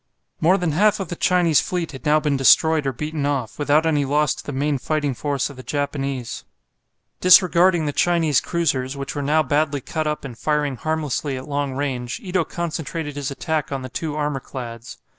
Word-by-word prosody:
More 180 +5 +4
than 175 -4 -1
half 210 +7 +3
of 195 - -4
the 175 - -4
Chinese 175 -4 +3
fleet 175 -2 -3
had 135 +2 -7
now 150 +1 +5
been 150 -2 0
destroyed 150 +2 +4
or - - +1
beaten 150 +3 -4
off, 140 -5 -2
without 145 +2 +3
any 150 -3 +2
loss 145 +1 +2
to - - -10
the - - -6
main 140 +1 -1
fighting 150 0 -1
force 140 +2 -2
of 140 - -14
the - - -7
Japanese. 140 -3 -3 0.8
Disregarding 180 -2 +5
the 145 - -2
Chinese 165 -5 +2
cruisers, 140 -6 -1
which 140 0 -5
were 145 - -3
now 150 +3 +2
badly 145 +1 0
cut 155 +4 -3
up 150 -1 -3
and 125 -3 -7
firing 150 +1 0
harmlessly 150 -2 -2
at 130 +3 -8
long 145 -2 -2
range, 130 -3 -3
Ito 180 -3 -1
concentrated 160 -3 -4
his 145 -2 -3
attack 155 +1 -2
on 135 -1 -3
the 130 - -6
two 150 +4 -4
armour 150 -2 -1
clads. 120 -3 -8
150 Hz, 200 wpm, -22 LUFS, 135-160 Hz, 0.8 s, now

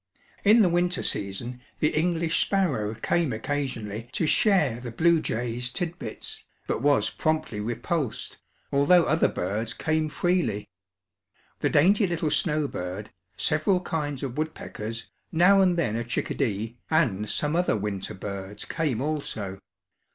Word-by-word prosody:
In 220 +2 +7
the - - +5
winter 175 +1 +1
season 120 +6 -1 0.2
the 150 - +1
English 165 0 +1
sparrow 135 - +1
came 160 +6 0
occasionally 115 -3 -3
to 165 - 0
share 155 - +3
the 120 -1 -6
bluejays' 125 -5 +1
tidbits, 170 - -5 0.2
but - - -2
was 145 +1 +3
promptly 155 -8 -1
repulsed, 120 - -3 0.3
although 155 +6 +5
other 155 +1 +3
birds 105 +5 -2
came 155 0 0
freely. 170 - 0 0.9
The - - +1
dainty 195 +7 +4
little 165 -3 -1
snowbird, 105 - -1 0.3
several 155 +5 +2
kinds 150 -6 -3
of 135 +1 -4
woodpeckers, 115 -7 -4 0.3
now 185 +4 +6
and 180 -2 +3
then 120 -10 0
a 115 - -1
chickadee, 115 -1 -2
and 110 - +1
some 150 +2 0
other 175 -10 +2
winter 100 -3 -3
birds 100 +1 -6
came 150 -8 -1
also. 110 -10 -3
145 Hz, 130 wpm, -26 LUFS, 110-165 Hz, 0.9 s, In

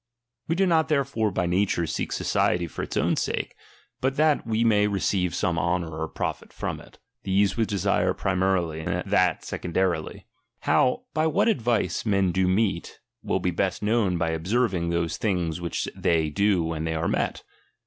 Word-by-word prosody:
We 165 - +1
do 190 +2 +3
not 160 -4 +3
therefore 140 -7 +1
by 90 -2 -1
nature 90 -1 +1
seek - - -3
society 90 -1 +1
for 80 - -6
its - - -4
own - - +2
sake, - - -2 0.5
but 135 +1 0
that 150 -5 +2
we 115 0 +1
may 105 -3 +4
receive 95 -3 0
some 85 -4 0
honour 85 -1 -1
or 80 0 -3
profit - - -4
from - - -4
it; - - -16 0.2
these 95 0 +2
we 115 - +1
desire 95 -2 +1
primarily, 90 -4 0 0.2
that - - +2
secondarily. 90 +1 -2 0.4
How, 125 - +2
by 155 0 +2
what 160 - +2
advice, 120 - +1
men 100 -4 +2
do 95 +1 +1
meet, 95 -2 0 0.2
will - - -1
be 90 0 0
best 95 +3 -1
known 105 -4 +2
by 85 -1 0
observing 90 +1 0
those 85 -1 -1
things 90 -5 -1
which 85 - -2
they 80 -2 +1
do 100 +1 +2
when 80 -1 -3
they 80 0 -1
are 80 +1 -1
met. - - -1
95 Hz, 170 wpm, -25 LUFS, 85-110 Hz, 0.5 s, may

